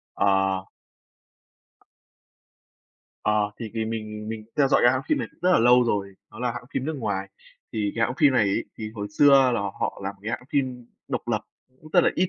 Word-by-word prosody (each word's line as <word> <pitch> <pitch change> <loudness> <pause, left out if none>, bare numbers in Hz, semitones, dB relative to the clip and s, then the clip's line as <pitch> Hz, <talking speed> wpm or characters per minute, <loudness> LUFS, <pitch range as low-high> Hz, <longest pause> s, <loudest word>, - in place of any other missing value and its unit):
Ờ. 95 -1 +2 2.6
Ờ, 105 -1 +2
thì 115 -3 -6
vì 110 -1 -1
mình 110 -1 -5
mình 110 -1 -5
theo 140 -2 +4
dõi 135 - +4
cái 120 - +7
hãng 130 - 0
phim - - +1
này - - -3
cũng - - -31
rất 180 +1 +4
là - - +5
lâu 125 +1 +6
rồi. 100 -4 -1 0.2
Đó 110 - -12
là 125 -1 -1
hãng 120 - -7
phim 130 - -1
nước 160 - -2
ngoài. 100 -6 -2 0.4
Thì 105 -2 -1
cái 115 - +2
hãng 125 - -2
phim 145 -4 +5
này 120 -4 +4
ấy, 100 - 0
thì 110 -1 -5
hồi 105 -2 -4
xưa 145 +7 +5 0.2
là 120 - 0
họ 100 0 -3
làm 100 +1 -3
cái 110 - -3
hãng 120 - -3
phim 130 -4 -1 0.2
độc - - -3
lập, - - +1 0.4
cũng 155 - -13
rất 175 -3 +5
là - - +4
ít 185 +1 +1
110 Hz, 215 wpm, -25 LUFS, 105-125 Hz, 2.6 s, cái